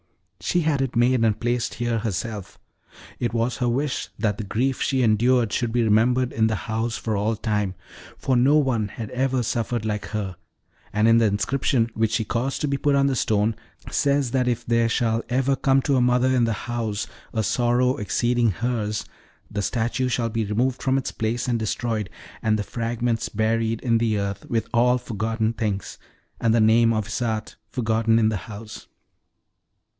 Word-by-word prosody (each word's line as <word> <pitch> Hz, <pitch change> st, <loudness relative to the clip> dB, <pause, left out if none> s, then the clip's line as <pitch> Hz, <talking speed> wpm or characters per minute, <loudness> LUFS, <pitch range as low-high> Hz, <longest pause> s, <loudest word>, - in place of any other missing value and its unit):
"She 175 Hz, -, 0 dB
had 150 Hz, -4 st, +1 dB
it 135 Hz, -3 st, -2 dB
made 120 Hz, 0 st, +3 dB
and 110 Hz, -2 st, +2 dB
placed 120 Hz, 0 st, -1 dB
here 120 Hz, -1 st, -1 dB
herself. 105 Hz, -1 st, -4 dB, 0.6 s
It 120 Hz, -, -1 dB
was 115 Hz, +1 st, 0 dB
her 125 Hz, -2 st, 0 dB
wish 135 Hz, +3 st, -1 dB
that 105 Hz, -2 st, -1 dB
the -, -, -2 dB
grief 125 Hz, +6 st, -1 dB
she 130 Hz, -2 st, +1 dB
endured 115 Hz, +1 st, +3 dB
should 120 Hz, -2 st, 0 dB
be 120 Hz, 0 st, +2 dB
remembered 120 Hz, +4 st, +2 dB
in 110 Hz, 0 st, +2 dB
the 110 Hz, -, 0 dB
house 110 Hz, +2 st, -2 dB
for 110 Hz, -2 st, -2 dB
all 105 Hz, +3 st, 0 dB
time, 105 Hz, -3 st, -1 dB, 0.4 s
for 130 Hz, -, 0 dB
no 130 Hz, +5 st, +4 dB
one 125 Hz, -8 st, +1 dB
had 110 Hz, +2 st, -7 dB
ever 130 Hz, 0 st, 0 dB
suffered 115 Hz, 0 st, -2 dB
like 105 Hz, -1 st, -2 dB
her; 105 Hz, -4 st, -4 dB, 0.6 s
and 105 Hz, +2 st, +2 dB
the -, -, +4 dB
inscription, 115 Hz, +3 st, +1 dB
which 110 Hz, -1 st, 0 dB
she 110 Hz, -1 st, 0 dB
caused 125 Hz, +5 st, -2 dB
to 150 Hz, -, +1 dB
be 140 Hz, 0 st, 0 dB
put 145 Hz, 0 st, +2 dB
on 140 Hz, 0 st, +3 dB
the 135 Hz, -1 st, +1 dB
stone, 110 Hz, -1 st, +1 dB, 0.4 s
says 140 Hz, -3 st, +1 dB
that 130 Hz, -1 st, +1 dB
if 120 Hz, -1 st, -1 dB
there 115 Hz, 0 st, +2 dB
shall 115 Hz, -1 st, +1 dB
ever 135 Hz, +2 st, +2 dB
come 135 Hz, 0 st, +2 dB
to 140 Hz, -, +2 dB
a 130 Hz, -, +3 dB
mother 125 Hz, +1 st, +3 dB
in 125 Hz, -2 st, +3 dB
the 115 Hz, -, 0 dB
house 115 Hz, -4 st, -2 dB, 0.3 s
a 110 Hz, -2 st, -1 dB
sorrow 125 Hz, +3 st, +2 dB
exceeding 120 Hz, +4 st, +1 dB
hers, 110 Hz, 0 st, -2 dB, 0.5 s
the 105 Hz, -, -2 dB
statue 120 Hz, +4 st, -1 dB
shall 120 Hz, -2 st, 0 dB
be 115 Hz, 0 st, -1 dB
removed 120 Hz, +5 st, 0 dB
from 130 Hz, 0 st, +2 dB
its 135 Hz, -, -2 dB
place 115 Hz, +3 st, -2 dB
and 120 Hz, -2 st, +1 dB
destroyed, 110 Hz, -1 st, -2 dB, 0.3 s
and 110 Hz, -1 st, +2 dB
the 105 Hz, -, -2 dB
fragments 115 Hz, +1 st, -2 dB
buried 110 Hz, +1 st, 0 dB
in 115 Hz, -3 st, +2 dB
the 110 Hz, -2 st, +1 dB
earth 100 Hz, 0 st, -4 dB
with 115 Hz, -1 st, 0 dB
all 125 Hz, +1 st, +4 dB
forgotten 110 Hz, -1 st, -2 dB
things, 105 Hz, -4 st, -3 dB, 0.4 s
and 115 Hz, -1 st, +3 dB
the -, -, +4 dB
name 115 Hz, +1 st, +5 dB
of 110 Hz, -2 st, 0 dB
Isarte 110 Hz, +1 st, -3 dB
forgotten 115 Hz, -2 st, +1 dB
in 110 Hz, -1 st, +3 dB
the 110 Hz, -, -1 dB
house." 110 Hz, +1 st, -9 dB
115 Hz, 185 wpm, -24 LUFS, 110-125 Hz, 0.6 s, name